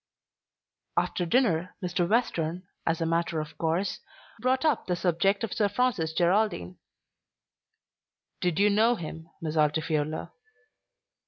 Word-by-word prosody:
After 175 - 0
dinner, 185 -6 +2
Mr. 175 -1 0
Western, 180 -6 0 0.2
as 165 0 +1
a - - +1
matter 165 0 0
of 155 +1 -6
course, 170 +4 0 0.4
brought 260 +3 +1
up 300 -6 +1
the 180 - +1
subject 185 +4 +1
of 225 - -2
Sir 210 -4 +2
Francis 205 -8 +1
Geraldine. 175 - +1 1.6
"Did 175 -3 0
you 205 +1 +4
know 225 +4 +4
him, 165 -3 -7
Miss 155 -1 -2
Altifiorla?" 155 0 0
175 Hz, 120 wpm, -28 LUFS, 160-210 Hz, 1.6 s, you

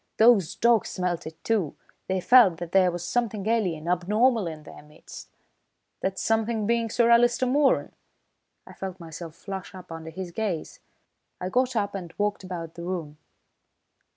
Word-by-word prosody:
Those 210 -6 +5
dogs 235 -2 +3
smelt 180 -3 -2
it, 160 0 -11
too. 205 -10 0 0.3
They 190 -1 -1
felt 225 -7 +6
that 175 0 -6
there 190 -2 +5
was 175 -1 -4
something 215 -1 -1
alien, 180 -9 0
abnormal 210 +5 +2
in 155 -2 -7
their - - -12
midst." 150 +1 -13 0.7
"That 190 0 -2
something 225 -1 0
being 230 +1 +1
Sir 235 +1 +3
Alister 240 +2 +4
Moeran?" 275 +2 +2 0.7
I - - -13
felt 190 -1 -6
myself 165 -1 -9
flush 190 +1 -7
up 185 -2 -11
under 165 0 -7
his 175 +2 -7
gaze. 190 -5 -3 0.6
I 180 - -3
got 255 +3 +1
up 205 -2 0
and 180 -4 -6
walked 205 -1 -1
about 170 -3 -6
the 170 - -9
room. 165 -5 -5
190 Hz, 160 wpm, -26 LUFS, 170-225 Hz, 0.7 s, felt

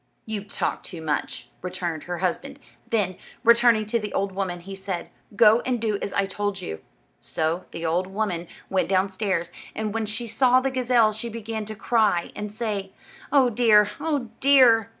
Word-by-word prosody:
"You 215 -3 -4
talk 205 - -3
too 175 - -9
much," 150 -5 -3
returned 175 -4 -4
her 175 0 -4
husband; - - -2 0.3
then, 195 -5 0 0.4
turning 235 -2 +3
to 230 +2 0
the 210 -2 -5
old 195 0 0
woman, 185 -2 -3
he 195 +3 -9
said, 190 -2 -5 0.2
"Go 220 +2 +6
and 245 -1 -1
do 215 -2 -1
as - - -3
I 200 - +2
told 200 0 -3
you." 80 - -6 0.4
So 165 +3 -2
the 165 - -6
old 175 +3 +1
woman 190 -4 -2 0.2
went 190 -1 0
downstairs, 190 -2 0 0.2
and 215 -1 -2
when 225 -1 -1
she 220 +3 -3
saw 250 +3 +4
the 270 +1 -1
gazelle, 245 -4 +3
she 220 +2 -5
began 220 -1 -5
to 215 +1 -6
cry, 210 -6 +1
and 210 0 -5
say, 205 -3 -3 0.4
"Oh, 265 -3 +5
dear! 210 -3 +5
oh, 290 -6 -1
dear!" 250 -5 +6
210 Hz, 175 wpm, -25 LUFS, 185-230 Hz, 0.4 s, Go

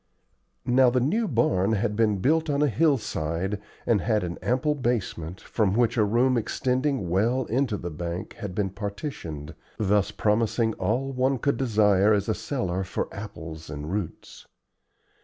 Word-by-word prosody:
Now 125 0 +5
the 125 +1 +2
new 205 - +1
barn 110 - +2
had 105 0 0
been 105 -2 +2
built 160 - +2
on 145 0 +2
a - - +4
hillside, 105 - 0 0.2
and 110 -5 +3
had 110 -1 +1
an 85 -1 -4
ample 130 +5 +1
basement, 105 - -2
from 105 -4 0
which 120 0 +2
a 110 - +3
room 120 +5 +3
extending 130 0 -1
well 115 +9 +1
into 125 -2 0
the 85 -1 -5
bank 85 +4 -5
had 100 -5 -5
been 95 -2 0
partitioned, 100 - -6 0.2
thus 105 -1 +2
promising 110 +1 +1
all 120 +9 -1
one 130 +1 +1
could 140 +4 0
desire 105 -5 +4
as 100 -1 +1
a 110 - +2
cellar 95 -11 -2
for 95 - -4
apples 80 -6 -8
and 75 +2 -5
roots. 100 -5 -5
110 Hz, 160 wpm, -26 LUFS, 95-125 Hz, 0.2 s, Now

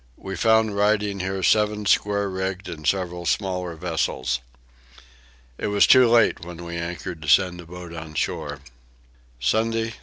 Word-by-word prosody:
We 95 0 -6
found 110 +1 +3
riding 105 -1 +1
here 95 0 -3
seven 105 0 +2
square 100 0 +2
rigged 95 0 -4
and 80 -4 -6
several 90 -2 -1
smaller 90 -3 -1
vessels. 70 -7 -1 1.2
It - - -2
was 105 -1 +4
too 130 -2 +7
late 115 -7 +3
when 85 0 -9
we 85 0 -6
anchored 85 0 -5
to 75 - -8
send 90 +3 +3
a 85 - -14
boat 90 0 -9
on 80 -1 -8
shore. 70 -1 -3 0.8
Sunday 115 - 0
13. - - -9
95 Hz, 155 wpm, -23 LUFS, 85-105 Hz, 1.2 s, too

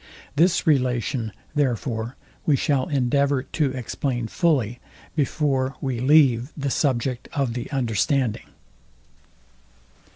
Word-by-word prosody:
This 170 +3 +3
relation, 125 -4 +1 0.2
therefore, 120 -4 -1 0.3
we 150 - +3
shall 135 -2 +1
endeavour 140 0 +1
to 145 0 0
explain 125 0 -3
fully 125 - +1 0.4
before 135 -2 0
we 130 -3 -2
leave 130 -2 +4
the 140 -2 -2
subject 125 -3 0
of 135 -6 0
the 120 0 -5
understanding. 125 -1 0
130 Hz, 100 wpm, -24 LUFS, 120-145 Hz, 0.4 s, leave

